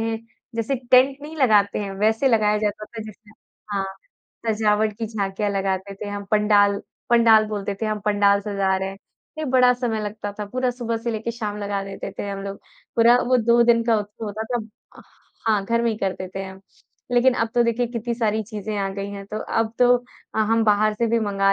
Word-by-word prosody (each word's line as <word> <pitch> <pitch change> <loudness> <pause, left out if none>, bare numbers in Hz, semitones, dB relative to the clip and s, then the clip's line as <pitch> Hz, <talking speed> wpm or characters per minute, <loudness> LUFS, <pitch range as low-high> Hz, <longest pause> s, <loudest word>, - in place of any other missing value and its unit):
हैं, 225 0 -1 0.4
जैसे 230 +4 -1 0.2
टेंट 260 +2 +6
नहीं 315 +2 -8
लगाते 210 -7 +3
हैं 200 -2 -4
वैसे 220 +5 +3
लगाया 210 -2 +3
जाता 210 0 -2
था 225 0 -8
जिसमें 215 0 -13 0.4
हाँ। 195 -1 0 0.6
सजावट 215 -1 +2
की 225 - -2
झाँकियाँ 205 -1 -2
लगाते 195 0 -2
थे 205 +1 -7
हम 205 0 -5
पंडाल, 205 -1 +4 0.3
पंडाल 230 -2 +6
बोलते 205 -1 -3
थे 220 - +1
हम 215 -1 -2
पंडाल 200 -1 +3
सजा 200 -2 0
रहे 190 0 -2
हैं। 195 - -11 0.4
ए 310 - -2
बड़ा 250 -1 +5
समय 240 -3 -2
लगता 205 0 -5
था 210 - -2
पूरा 255 +3 -1
सुबह 240 -2 -3
से 235 +1 -3
लेके 225 +1 -3
शाम 215 -3 -4
लगा 200 -1 -2
देते 195 - -6
थे 200 - -3
हम 195 0 -4
लोग, 200 0 -5 0.4
पूरा 235 +1 +6
वो 255 +1 +4
2 235 0 +4
दिन 235 -1 +4
का 230 -2 +3
उत्सव 210 +2 -7
होता 215 +1 -4
था। - - +2 0.4
अह - - -12 0.5
हाँ, 210 -3 +2
घर 235 +3 +1
में 235 - +2
ही 215 - -3
करते 185 -1 -3
थे 195 - -3
हम, 190 0 -10 0.5
लेकिन 245 +1 +4
अब 225 - 0
तो 240 - +5
देखिए 235 +1 +1
कितनी 235 0 -3
सारी 220 -2 0
चीज़ें 215 0 -5
आ 195 - 0
गई 200 0 -4
हैं 200 -1 -7
तो 210 +2 -5
अब 225 0 -1
तो 245 0 +6 0.4
अ, - - -1
हम 225 +1 +2
बाहर 215 0 +3
से 230 +2 0
भी 230 +1 +2
मँगा 195 -2 +2
215 Hz, 215 wpm, -23 LUFS, 200-230 Hz, 0.6 s, टेंट